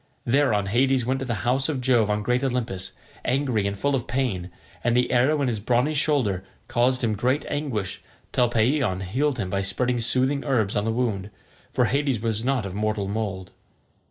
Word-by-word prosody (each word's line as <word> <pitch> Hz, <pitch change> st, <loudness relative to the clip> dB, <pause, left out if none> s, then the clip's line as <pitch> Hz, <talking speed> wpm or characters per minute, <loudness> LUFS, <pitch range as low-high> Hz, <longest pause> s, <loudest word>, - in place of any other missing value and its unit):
Thereon 120 Hz, -5 st, +2 dB
Hades 125 Hz, +4 st, +2 dB
went 130 Hz, +2 st, 0 dB
to 135 Hz, -, -3 dB
the 115 Hz, -3 st, -3 dB
house 130 Hz, +4 st, +2 dB
of 145 Hz, -4 st, -1 dB
Jove 120 Hz, -4 st, +3 dB
on 105 Hz, 0 st, 0 dB
great 125 Hz, +4 st, +1 dB
Olympus, 115 Hz, -8 st, -2 dB, 0.3 s
angry 125 Hz, -6 st, +1 dB
and 100 Hz, 0 st, -3 dB
full 140 Hz, +6 st, 0 dB
of 125 Hz, -3 st, -1 dB
pain; 120 Hz, -8 st, -1 dB, 0.3 s
and 120 Hz, 0 st, +2 dB
the 125 Hz, -, +2 dB
arrow 140 Hz, +4 st, +3 dB
in -, -, +1 dB
his 115 Hz, -4 st, -1 dB
brawny 125 Hz, +7 st, +1 dB
shoulder 130 Hz, -11 st, +1 dB, 0.2 s
caused 125 Hz, +1 st, +2 dB
him 110 Hz, -2 st, +2 dB
great 125 Hz, +7 st, 0 dB
anguish 125 Hz, -10 st, -3 dB, 0.3 s
till 125 Hz, -2 st, +2 dB
Paeeon 120 Hz, -4 st, +1 dB
healed 130 Hz, +9 st, 0 dB
him 95 Hz, -5 st, -3 dB
by 100 Hz, +1 st, 0 dB
spreading 120 Hz, +6 st, 0 dB
soothing 130 Hz, +4 st, +1 dB
herbs 110 Hz, -8 st, +1 dB
on 105 Hz, -, +1 dB
the 115 Hz, -, +1 dB
wound, 110 Hz, -5 st, -1 dB, 0.4 s
for 125 Hz, -1 st, +2 dB
Hades 135 Hz, +1 st, +1 dB
was 110 Hz, 0 st, -1 dB
not 130 Hz, -4 st, 0 dB
of 95 Hz, -, -5 dB
mortal 105 Hz, -1 st, -1 dB
mould. 100 Hz, -3 st, -3 dB
120 Hz, 190 wpm, -25 LUFS, 105-130 Hz, 0.4 s, Jove